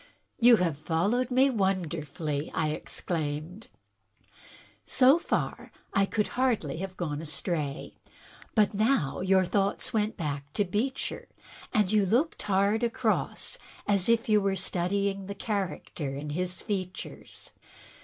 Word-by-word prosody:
"You 240 0 +8
have 170 -8 0
followed 200 - +1
me 265 +2 +4
wonderfully!" 165 - -1
I 155 -1 +1
exclaimed. 155 +4 -3 0.6
" - - -24
So 270 +5 +7
far - - -2 0.2
I 195 0 +3
could 210 0 0
hardly 240 - 0
have 190 +1 -5
gone 150 -4 -2
astray. 155 -1 -3 0.6
But 215 -2 +4
now 210 - +1
your 190 0 +4
thoughts 200 +2 0
went 215 0 0
back 145 -3 -4
to 205 - +1
Beecher, 230 +9 -2 0.4
and 210 -3 +2
you 210 -1 +4
looked 260 - +1
hard 200 +2 +2
across 240 - -1 0.3
as 200 0 +2
if 230 0 +3
you 215 -1 +4
were 195 -1 +1
studying 195 +2 -1
the 200 - -5
character 190 -9 -3
in 145 +1 -5
his 180 +3 -3
features. 185 -3 -5
195 Hz, 130 wpm, -29 LUFS, 160-215 Hz, 0.6 s, You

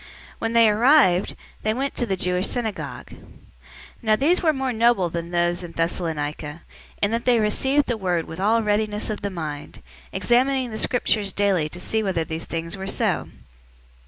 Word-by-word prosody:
When 225 0 -2
they 230 -1 +6
arrived, 215 - +4 0.3
they 215 0 0
went 275 +2 -2
into 240 - -2
the 195 - 0
Jewish 180 +1 0
synagogue. 225 -4 -4
017:011 - - -13 0.8
Now 220 -3 +3
these 320 +10 +2
were 320 - +4
more 265 -3 -2
noble 225 -5 +3
than 170 0 -4
those 175 0 0
in 175 -2 -9
Thessalonica, 160 -2 -3 0.4
in 205 - +3
that 230 +1 -1
they 245 -2 +4
received 265 +7 +2
the 240 - -2
word 180 -5 -1
with 160 - -9
all 220 +4 +2
readiness 210 0 0
of 210 - -5
the 200 - -2
mind, 155 -6 -7 0.3
examining 255 +1 +1
the 220 - -4
Scriptures 215 -5 +1
daily 190 -6 +1
to 175 - -9
see 220 +4 -1
whether 190 -5 0
these 160 +1 -6
things 165 +2 -4
were 190 0 -6
so. - - -1
205 Hz, 180 wpm, -23 LUFS, 175-235 Hz, 0.8 s, they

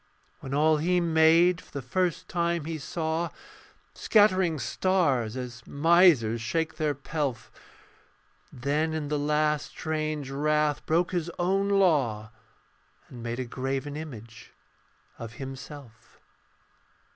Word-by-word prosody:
When 135 - -8
all 155 +2 +3
He 180 +4 +1
made 165 +1 +4
for - - -21
the 140 - -6
first 180 +6 -1
time 170 -3 -1
He 160 -1 -4
saw, 160 +3 -2 0.6
Scattering 190 -6 +3
stars 140 - 0
as 125 -1 -6
misers 150 -8 +4
shake 160 +8 -2
their 150 -2 0
pelf. 140 -2 -4 1.0
Then 150 +5 -1
in 150 -2 -3
the 150 -1 0
last 150 0 +1
strange 155 -3 -3
wrath 150 +1 0
broke 170 +3 +1
His 175 -2 -2
own 195 +3 +1
law, 140 - +2 0.8
And 120 - -10
made 120 +1 -4
a 130 - -2
graven 135 +3 -4
image 115 -7 -9 0.7
of 115 -1 -7
Himself. 135 -2 -10
150 Hz, 120 wpm, -27 LUFS, 130-170 Hz, 1.0 s, made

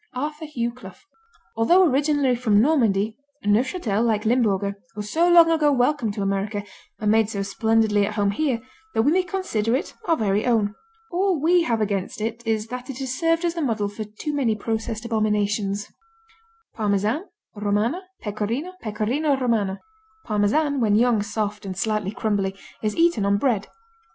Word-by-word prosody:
Arthur 300 +4 -4
Hugh 240 -6 -2
Clough 190 -7 -13 0.5
Although 345 +12 +5
originally 285 -2 +2
from 220 -4 +3
Normandy, 220 -6 +2 0.3
Neufchâtel, 225 - +1
like 220 -2 +1
Limburger, 205 -4 +1 0.2
was 210 0 -5
so 340 +2 +3
long 340 -1 +7
ago 305 -3 +3
welcomed 245 -4 +1
to 200 - -2
America 200 +1 -1 0.4
and 210 -1 +1
made 220 -1 +3
so 200 -3 -2
splendidly 215 0 +2
at 210 - -5
home 205 -2 +2
here 245 0 -1 0.3
that 225 - +3
we 285 - +3
may 370 +3 +4
consider 305 - -1
it 270 - -3
our 330 - +3
very 205 -1 +1
own. 215 -4 +2 0.4
All 365 -1 +1
we 345 +4 +4
have 230 -5 0
against 200 -2 -2
it 225 +2 -3
is 220 -1 0
that 250 +2 -6
it 265 - -5
has 265 -2 -3
served 330 +3 +1
as 340 - 0
the 335 - -3
model 225 -7 0
for 205 +2 -6
too 215 +9 -6
many 250 -7 +1
processed 220 +1 -3
abominations. 210 -2 0 0.9
Parmesan, 215 - 0 0.3
Romano, 210 - 0 0.2
Pecorino, 225 - -3
Pecorino 250 +7 0
Romano 220 -7 0 0.5
Parmesan 260 +8 +1
when 215 -4 +3
young, 230 -1 +3
soft 210 0 -3
and 190 -2 -6
slightly 215 -2 -1
crumbly 205 -3 -1 0.3
is 215 -1 -1
eaten 335 -10 +3
on 200 0 +2
bread. 220 -3 0
225 Hz, 165 wpm, -23 LUFS, 205-275 Hz, 0.9 s, long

